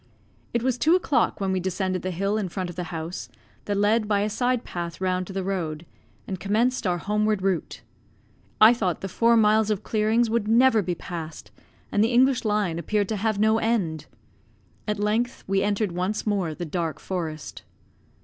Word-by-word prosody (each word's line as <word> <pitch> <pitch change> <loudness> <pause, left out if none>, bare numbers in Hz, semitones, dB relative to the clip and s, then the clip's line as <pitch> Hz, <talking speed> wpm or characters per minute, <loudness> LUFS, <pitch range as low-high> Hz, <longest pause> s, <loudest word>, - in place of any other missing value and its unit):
It 235 0 -1
was 255 -1 0
two 320 +7 +4
o'clock 315 -10 +1
when 195 -1 -1
we 190 - +1
descended 185 0 -2
the 185 - -3
hill 195 +3 -1
in 205 -4 -1
front 180 0 -4
of - - -13
the 180 0 -4
house, 165 +1 -6 0.4
that 205 -1 -1
led 210 +2 +2
by 205 -1 +2
a 210 +1 -1
side 245 +2 0
path 170 -1 -5
round 185 -1 -1
to 195 - -8
the 195 0 -2
road, 170 -4 -3 0.4
and 190 -2 -4
commenced 225 +4 +1
our 175 -1 +1
homeward 210 +1 0
route. 190 -3 -1 0.8
I 220 +2 +8
thought 190 -8 -1
the 195 - -3
four 230 +5 +3
miles 215 0 +4
of 210 -1 -1
clearings 220 +2 +2
would 225 -1 0
never 230 0 +5
be 180 -2 -2
passed; 165 -3 -7 0.4
and 205 - +3
the 225 - +2
English 255 +1 +4
Line 205 -6 0
appeared 205 +4 0
to 220 - -1
have 215 +1 0
no 220 +2 +3
end. 175 -10 -1 0.8
At 210 0 -1
length 220 +4 -1
we 195 0 +1
entered 205 -1 0
once 185 +5 -2
more 190 -7 -1
the 175 - -5
dark 165 0 -3
forest. 160 -5 -5
205 Hz, 190 wpm, -25 LUFS, 180-220 Hz, 0.8 s, I